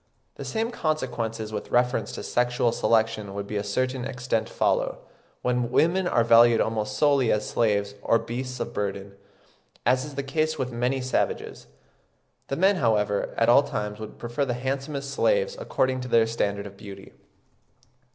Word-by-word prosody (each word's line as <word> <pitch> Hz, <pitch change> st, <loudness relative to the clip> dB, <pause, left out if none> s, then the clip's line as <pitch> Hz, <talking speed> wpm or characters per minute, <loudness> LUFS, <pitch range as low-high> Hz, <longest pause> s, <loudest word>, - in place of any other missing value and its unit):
The -, -, -8 dB
same 225 Hz, +1 st, -2 dB
consequences 115 Hz, -, -2 dB
with -, -, -5 dB
reference 125 Hz, +1 st, +1 dB
to -, -, -6 dB
sexual 120 Hz, -1 st, +1 dB
selection 110 Hz, -3 st, +1 dB
would 100 Hz, 0 st, -4 dB
to 105 Hz, -, -2 dB
a 100 Hz, -, -1 dB
certain 130 Hz, +5 st, -1 dB
extent 130 Hz, -1 st, -2 dB
follow, -, -, 0 dB, 0.5 s
when 125 Hz, -1 st, 0 dB
women 175 Hz, +8 st, +2 dB
are 115 Hz, -, +3 dB
valued 115 Hz, 0 st, +6 dB
almost 105 Hz, -1 st, -1 dB
solely 140 Hz, -3 st, +3 dB
as 105 Hz, 0 st, 0 dB
slaves 100 Hz, -3 st, +1 dB
or 115 Hz, -, +3 dB
beasts 125 Hz, +3 st, -5 dB
of -, -, -4 dB
burden, 100 Hz, -1 st, -3 dB, 0.7 s
as 130 Hz, +1 st, +3 dB
is 145 Hz, -1 st, -8 dB
the 140 Hz, -, -2 dB
case 155 Hz, +3 st, -1 dB
with 130 Hz, -2 st, -2 dB
many 125 Hz, +3 st, -1 dB
savages. 130 Hz, 0 st, -2 dB, 0.8 s
The 135 Hz, -, -2 dB
men, 190 Hz, +5 st, +3 dB
however, 105 Hz, -, +1 dB
at 115 Hz, -, +3 dB
all 120 Hz, +4 st, +7 dB
times 105 Hz, -6 st, -4 dB
would 110 Hz, -, -8 dB
prefer 120 Hz, +4 st, -2 dB
the 125 Hz, -3 st, -1 dB
handsomest 135 Hz, +2 st, -3 dB
slaves 485 Hz, -, +1 dB
according 130 Hz, -, 0 dB
to 125 Hz, -, -5 dB
their 115 Hz, -2 st, +4 dB
standard 100 Hz, -3 st, -2 dB
of 100 Hz, -1 st, -10 dB
beauty. 100 Hz, -1 st, -11 dB
120 Hz, 165 wpm, -26 LUFS, 110-135 Hz, 0.8 s, all